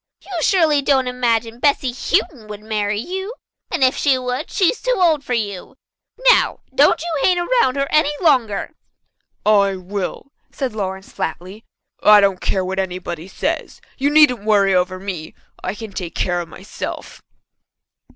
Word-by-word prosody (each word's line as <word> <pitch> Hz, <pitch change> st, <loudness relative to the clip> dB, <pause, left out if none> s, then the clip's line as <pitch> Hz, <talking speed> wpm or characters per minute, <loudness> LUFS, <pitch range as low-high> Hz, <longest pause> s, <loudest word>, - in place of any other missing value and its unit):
You -, -, -13 dB
surely 315 Hz, -5 st, +3 dB
don't 270 Hz, -2 st, +2 dB
imagine 235 Hz, -2 st, -1 dB
Bessy 280 Hz, -2 st, +2 dB
Houghton 250 Hz, -, -1 dB
would 210 Hz, -1 st, -8 dB
marry 210 Hz, -1 st, -1 dB
you. 380 Hz, -, -5 dB, 0.3 s
And -, -, 0 dB
if 260 Hz, +1 st, +4 dB
she 275 Hz, -3 st, +2 dB
would, 250 Hz, 0 st, -4 dB
she 375 Hz, -4 st, +2 dB
is -, -, -10 dB
too -, -, +1 dB
old 325 Hz, -6 st, +3 dB
for 250 Hz, -, -2 dB
you. 205 Hz, 0 st, -4 dB, 0.6 s
Now, -, -, +2 dB
don't 285 Hz, +3 st, +4 dB
you 330 Hz, -2 st, -3 dB
hang 365 Hz, +3 st, +3 dB
around 350 Hz, -, +2 dB
her 275 Hz, 0 st, 0 dB
any 305 Hz, -1 st, +3 dB
longer." 255 Hz, -, +1 dB, 0.7 s
"I 200 Hz, -2 st, +4 dB
will," 190 Hz, +8 st, -5 dB, 0.2 s
said 265 Hz, -5 st, -3 dB
Lawrence 190 Hz, -2 st, -5 dB
flatly. 185 Hz, +6 st, -6 dB, 0.4 s
"I 210 Hz, 0 st, +7 dB
don't 195 Hz, -2 st, +2 dB
care 190 Hz, -1 st, -1 dB
what 190 Hz, +1 st, -3 dB
anybody 180 Hz, -2 st, -4 dB
says. -, -, -3 dB, 0.2 s
You 280 Hz, +2 st, +2 dB
needn't 290 Hz, -7 st, +5 dB
worry 200 Hz, -2 st, +3 dB
over 185 Hz, 0 st, 0 dB
me. 185 Hz, -5 st, -6 dB, 0.3 s
I -, -, -3 dB
can 220 Hz, -1 st, -8 dB
take 175 Hz, -3 st, -6 dB
care 175 Hz, -1 st, 0 dB
of 170 Hz, -, -9 dB
myself." 190 Hz, +4 st, -8 dB
225 Hz, 160 wpm, -19 LUFS, 195-285 Hz, 0.7 s, I